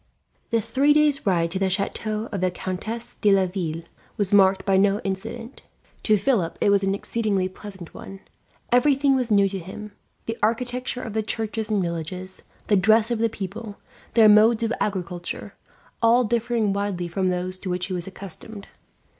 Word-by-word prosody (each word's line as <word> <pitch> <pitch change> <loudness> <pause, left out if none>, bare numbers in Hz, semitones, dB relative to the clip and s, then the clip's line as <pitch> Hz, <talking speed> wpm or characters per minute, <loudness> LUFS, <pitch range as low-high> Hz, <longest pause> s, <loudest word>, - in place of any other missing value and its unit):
The 230 -1 +1
three 265 +7 +3
days' 295 -5 +2
ride 170 -3 +2
to 190 - -2
the 195 -1 +1
chateau 215 +3 -2
of 200 -4 -3
the 185 - +2
Countess 205 +6 -5
de 210 - +2
Laville 180 -4 0 0.3
was 205 -1 0
marked 190 -1 +5
by 195 - +3
no 200 +1 +3
incident. 205 +6 -5 0.4
To 215 -1 +3
Philip 200 -5 0
it 205 - +3
was 200 -1 +4
an 195 0 +1
exceedingly 200 -3 -1
pleasant 190 -2 -10
one. 195 0 -10 0.5
Everything 275 +2 +4
was 250 -2 0
new 200 -2 +4
to 195 0 -4
him; 205 +4 -9 0.3
the 225 0 -4
architecture 245 +3 -1
of 220 - -6
the 220 - +1
churches 220 0 -3
and 205 -3 +1
villages, 175 +2 -5 0.2
the 210 - +3
dress 220 +4 +4
of 235 - 0
the 230 0 +2
people, 210 +1 -7 0.4
their 225 -2 +7
modes 220 +2 +6
of 230 +1 0
agriculture, 180 -3 -4 0.5
all 235 +2 +5
differing 230 -2 0
widely 200 -3 -2
from 185 +2 -1
those 180 +1 -3
to 185 - -6
which 180 0 -1
he 190 - -5
was 175 -1 -3
accustomed. 195 +2 -8
205 Hz, 175 wpm, -24 LUFS, 185-225 Hz, 0.5 s, their